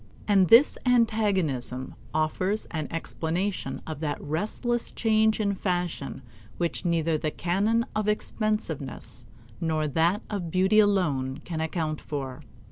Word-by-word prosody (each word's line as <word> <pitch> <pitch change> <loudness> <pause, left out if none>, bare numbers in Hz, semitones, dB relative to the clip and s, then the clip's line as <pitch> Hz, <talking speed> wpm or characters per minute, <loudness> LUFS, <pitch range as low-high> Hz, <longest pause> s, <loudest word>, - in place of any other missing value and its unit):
And 195 -3 +5
this 235 - +7
antagonism 195 - +1 0.2
offers 185 +7 0
an 155 -3 -3
explanation 170 +4 -3
of 155 -2 -5
that 150 -2 -2
restless 215 - -2
change 220 -1 +2
in 200 -2 +1
fashion 175 -8 -2 0.3
which 170 -1 -1
neither 165 -2 +1
the 155 - -1
canon 205 +9 +1
of 215 -1 0
expensiveness 210 - -2 0.3
nor 155 -2 0
that 165 +7 +1
of 195 -5 -3
beauty 190 +5 +4
alone 150 -11 +2
can 160 -2 -3
account 160 -1 -2
for. 135 -1 -5
175 Hz, 125 wpm, -27 LUFS, 155-210 Hz, 0.3 s, this